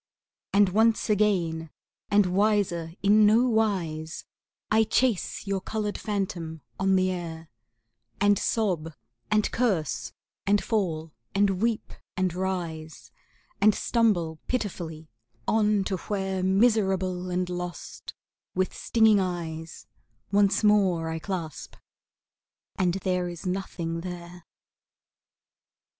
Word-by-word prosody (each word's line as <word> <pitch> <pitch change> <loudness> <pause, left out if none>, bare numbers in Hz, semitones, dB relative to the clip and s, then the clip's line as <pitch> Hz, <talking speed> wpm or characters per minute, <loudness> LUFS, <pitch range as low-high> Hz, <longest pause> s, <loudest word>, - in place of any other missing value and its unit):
And 200 -1 +5
once 220 +3 +3
again, 175 -6 +1 0.4
and 205 -1 +5
wiser 180 -4 +1
is 200 - +2
no 215 +3 +6
wise, 180 -9 -1 0.5
I 220 +1 +5
chase 220 -3 0
your 195 -1 -1
colored 210 +1 -3
phantom 175 -6 -3 0.2
on 190 0 +3
the 185 0 +2
air, 165 -3 -6 0.7
And 205 -1 +4
sob 175 -8 -1 0.3
and 215 0 +2
curse 160 - 0 0.4
and 205 0 +3
fall 165 -8 -1 0.2
and 195 -1 +2
weep 230 -1 -1 0.2
and 185 -2 +1
rise 170 -4 -4 0.5
And 210 0 +6
stumble 175 -9 +1
pitifully 170 -9 -3 0.4
on 210 -2 +3
to 190 0 -2
where, 190 0 -2
Miserable 190 -3 +2
and 180 0 -1
lost, 180 -2 -6 0.4
with 185 0 0
stinging 220 -3 +4
eyes, 165 -3 -4 0.5
Once 200 +1 +3
more 190 -6 +3
I 160 0 -3
clasp 160 -2 -5 1.0
and 180 -1 +1
there 180 -2 0
is 175 +1 -8
nothing 175 -3 -3
there. 175 -1 -8
185 Hz, 110 wpm, -27 LUFS, 170-210 Hz, 1.0 s, no